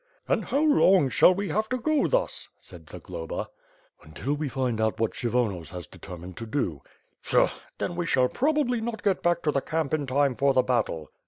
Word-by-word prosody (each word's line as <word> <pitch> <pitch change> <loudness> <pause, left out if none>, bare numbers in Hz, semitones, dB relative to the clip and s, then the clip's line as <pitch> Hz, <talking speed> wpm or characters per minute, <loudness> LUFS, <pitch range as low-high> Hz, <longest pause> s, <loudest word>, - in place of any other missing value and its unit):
"And - - +1
how 280 - 0
long 195 - +5
shall 180 - +6
we 200 +1 -3
have 215 +1 -1
to 255 - 0
go 300 +4 +1
thus?" - - -1
said 85 -5 -14
Zagloba. 80 - -6 0.5
'TJntil 100 - -3
we 145 -1 -3
find 125 -4 -1
out 110 0 0
what 115 -1 0
Kshyvonos 110 - -1
has 90 -1 -7
determined 90 0 -10
to 115 - -6
do." 95 - -2 0.4
"Pshaw! - - +3 0.3
Then 175 - -3
we 175 -1 -2
shall 130 -4 +3
probably 270 - +1
not 225 -1 -4
get 195 -3 +1
back 175 0 +1
to 150 - +2
the 140 - 0
camp 155 -2 -2
in 145 -3 0
time 135 0 +2
for 140 +1 +2
the 130 - +5
battle." 115 - -1
140 Hz, 195 wpm, -26 LUFS, -, 0.5 s, shall